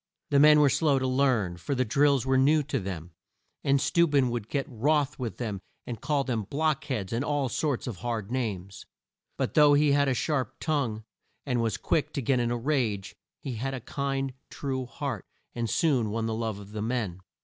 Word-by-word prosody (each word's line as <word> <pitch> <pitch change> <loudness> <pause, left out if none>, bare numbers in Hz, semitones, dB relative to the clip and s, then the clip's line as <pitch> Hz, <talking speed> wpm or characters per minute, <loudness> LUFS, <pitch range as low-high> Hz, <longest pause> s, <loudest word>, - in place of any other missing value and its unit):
The 140 - +5
men 150 +1 +8
were 145 -2 +6
slow 150 -2 +3
to 130 - 0
learn, 130 -9 +1
for 90 +11 -3
the 130 0 +1
drills 140 +2 +3
were 135 0 +2
new 145 +4 +4
to 135 -1 -2
them, 90 -4 -6 0.5
and 140 0 +3
Steu 170 +5 +3
ben 135 -4 +3
would 115 -3 -4
get 140 -2 -1
wroth 145 +4 0
with 120 -3 -4
them 105 -6 -4 0.2
and 115 -2 -6
call 145 -2 +1
them 120 -5 -1
"block 155 0 0
heads," 115 -9 -3
and 120 +4 0
all 145 -3 0
sorts 140 0 -1
of 120 -7 -5
hard 115 -1 -3
names. 100 -7 -4 0.5
But - - -1
though 145 -1 +6
he 145 0 +4
had 140 0 +3
a 130 - +1
sharp 135 +1 -1
tongue, 135 -9 -1 0.4
and 125 -4 0
was 115 -1 0
quick 155 - 0
to 140 - -2
get 130 +1 +2
in 120 -1 +1
a 120 - 0
rage, 115 -7 -1 0.3
he 135 - -4
had 135 +4 -2
a - - -4
kind, 135 +1 -2 0.2
true 130 -2 -3
heart, - - -4 0.3
and 115 -1 -2
soon 135 -10 +2
won 115 +2 -2
the 115 - -1
love 110 -2 -2
of 100 0 -11
the 105 0 -4
men. 110 -6 -2
130 Hz, 210 wpm, -28 LUFS, 115-140 Hz, 0.5 s, men